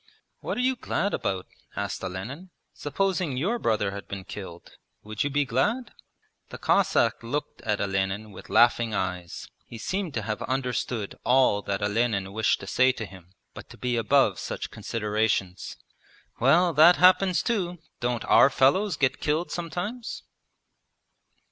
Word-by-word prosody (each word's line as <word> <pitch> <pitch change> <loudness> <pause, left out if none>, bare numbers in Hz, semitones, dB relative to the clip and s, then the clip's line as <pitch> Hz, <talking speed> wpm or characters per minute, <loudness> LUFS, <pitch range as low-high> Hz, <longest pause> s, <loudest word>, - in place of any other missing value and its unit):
'What - - -4
are - - 0
you 260 +1 +2
glad 205 -4 -2
about?' 95 -2 -2 0.3
asked 100 -2 -4
Olenin. 110 - -6 0.2
'Supposing 180 -2 -1
your 205 - 0
brother 105 - 0
had 100 0 -8
been 100 -1 -6
killed; 95 -3 -9 0.3
would 105 0 -3
you 145 - -1
be 145 0 +1
glad?' 210 - 0 0.6
The - - -8
Cossack - - +2
looked 145 +5 -4
at 105 -1 -1
Olenin 95 +2 -2
with 95 - -12
laughing 120 -2 +4
eyes. 90 -2 -4 0.2
He 115 - -9
seemed 185 - -3
to 110 - -2
have 105 0 -3
understood 125 -4 -2
all 125 -5 +4
that 100 0 -3
Olenin 100 -2 0
wished 110 0 +1
to - - -7
say 130 +6 +3
to 110 - -5
him, 95 -1 -15 0.2
but - - -11
to - - -13
be 125 -1 -1
above 135 +5 +3
such - - -5
considerations. 105 -4 -2 0.6
'Well, 165 +7 +4
that 165 +4 +7
happens 185 0 +4
too! 185 -7 -1 0.2
Don't 120 -1 -2
our - - +6
fellows 155 +7 +2
get 135 -2 +1
killed 155 +4 0
sometimes?' 180 +8 -5
120 Hz, 150 wpm, -26 LUFS, 100-170 Hz, 0.6 s, that